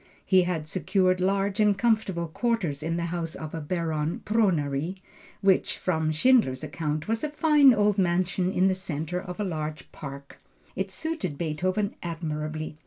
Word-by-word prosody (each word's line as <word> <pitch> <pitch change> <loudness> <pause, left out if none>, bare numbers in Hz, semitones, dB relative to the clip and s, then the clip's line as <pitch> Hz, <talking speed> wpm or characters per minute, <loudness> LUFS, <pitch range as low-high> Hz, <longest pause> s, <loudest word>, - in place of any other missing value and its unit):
He 190 -1 +5
had 165 -4 -2
secured 185 +2 +1
large 195 +2 +1
and 210 -2 +4
comfortable 200 -7 +1
quarters 180 - -1
in 165 +2 -1
the 170 - -1
house 165 -2 -3
of 155 -1 -7
a 165 - -4
Baron 160 -1 -2
Pronay, 175 -7 +1 0.5
which, 195 -2 +2
from 160 -3 0
Schindler's 155 - +3
account 150 +1 -3
was 225 +3 -1
a 305 - 0
fine 295 -2 +5
old 210 -3 +2
mansion 180 +1 +1
in 185 0 +3
the 190 - +3
centre 180 -2 -3
of 180 0 -8
a - - 0
large 155 -6 -4
park. 140 -1 -9 0.4
It 190 0 -2
suited 250 - -3
Beethoven 185 +6 -1
admirably. 155 -2 -4
180 Hz, 160 wpm, -27 LUFS, 155-195 Hz, 0.5 s, He